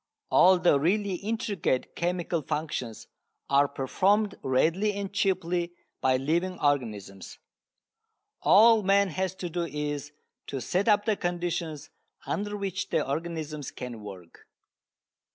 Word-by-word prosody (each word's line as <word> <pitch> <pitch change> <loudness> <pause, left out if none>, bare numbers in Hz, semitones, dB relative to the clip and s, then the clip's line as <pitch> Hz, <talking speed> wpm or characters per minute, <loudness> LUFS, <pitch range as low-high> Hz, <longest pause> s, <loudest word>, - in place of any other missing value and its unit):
All 185 +1 +6
the 175 -5 +3
really 195 +6 +1
intricate 200 - -2
chemical 175 -1 -1
functions 150 -6 -4 0.5
are 140 +1 +5
performed 195 +10 +1
readily 165 +11 +1
and 200 0 -5
cheaply 180 -3 0 0.3
by 130 -1 +3
living 170 +7 -1
organisms. 110 -10 -2 1.0
All 225 +2 +6
man 200 0 +3
has 185 +2 -2
to 185 - -5
do 170 0 -2
is 145 -1 -4 0.4
to 135 - -4
set 185 - -1
up 205 -1 +4
the 220 -2 +2
conditions 175 -4 -3 0.3
under 205 0 -3
which 195 -2 -3
the - - 0
organisms 155 -1 -4
can 120 -3 -7
work. 95 -5 -12
170 Hz, 120 wpm, -28 LUFS, 145-195 Hz, 1.0 s, All